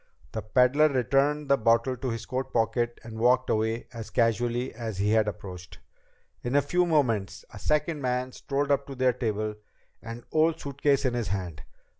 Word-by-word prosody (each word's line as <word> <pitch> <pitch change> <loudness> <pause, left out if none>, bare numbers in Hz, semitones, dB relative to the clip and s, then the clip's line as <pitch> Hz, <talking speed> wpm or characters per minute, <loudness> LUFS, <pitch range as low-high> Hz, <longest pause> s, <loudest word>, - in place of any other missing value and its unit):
The - - -3
peddler 125 +7 +4
returned 140 +3 +1
the 140 - +4
bottle 115 +3 +2
to 130 +1 -4
his 115 -1 -4
coat 130 +1 -3
pocket 120 +1 0
and 110 -1 -8
walked 125 +2 +3
away 110 +2 0
as 115 -2 -7
casually 120 +1 0
as 110 -4 -5
he 100 +2 +1
had 110 -1 +3
approached. 90 -3 -7 0.6
In 125 +3 -2
a 145 - +6
few 180 0 +1
moments 115 - 0
a 105 - -9
second 150 - 0
man 125 0 -1
strolled 140 +2 -2
up 140 - +1
to 135 - -7
their 130 -1 +2
table, 110 -3 -2 0.5
an 115 +1 -8
old 160 +1 +2
suitcase 140 0 0
in 125 - +1
his 120 -4 -2
hand. 90 -5 -4
120 Hz, 180 wpm, -27 LUFS, 110-140 Hz, 0.6 s, a